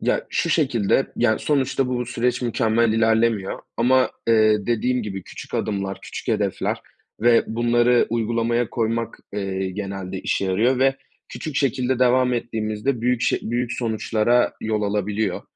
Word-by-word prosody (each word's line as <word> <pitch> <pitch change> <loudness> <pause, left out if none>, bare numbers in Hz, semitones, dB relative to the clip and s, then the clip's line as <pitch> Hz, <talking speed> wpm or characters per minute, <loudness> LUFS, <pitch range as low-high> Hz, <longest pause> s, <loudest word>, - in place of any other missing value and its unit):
Ya, - - 0
şu 170 - 0
şekilde, 135 -6 +1
yani, 115 -2 +2
sonuçta 135 -2 0
bu 125 -1 -2
süreç 125 +1 -1
mükemmel 115 -1 +2
ilerlemiyor 110 -2 +1 0.2
ama, 130 +2 +3 0.2
eee, 110 -2 +4
dediğim 125 +1 0
gibi, 95 -3 -5
küçük - - -10
adımlar, 100 -1 -2
küçük - - -8
hedefler - - -1 0.4
ve 120 0 +4
bunları 120 +1 +2
uygulamaya 115 +1 0
koymak, 115 -1 -2
eee, 95 -2 -2
genelde 95 -1 -5
işe 100 - -1
yarıyor 115 +8 +2
ve 135 0 +3 0.3
küçük 155 -3 -6
şekilde 130 -2 +1
devam 125 0 +3
ettiğimizde 115 +2 -2
büyük 125 0 +1
ş - - +1
büyük 120 +1 -2
sonuçlara 115 +1 +1
yol 110 -1 -1
alabiliyor. 105 +1 -1
115 Hz, 140 wpm, -22 LUFS, 105-125 Hz, 0.4 s, eee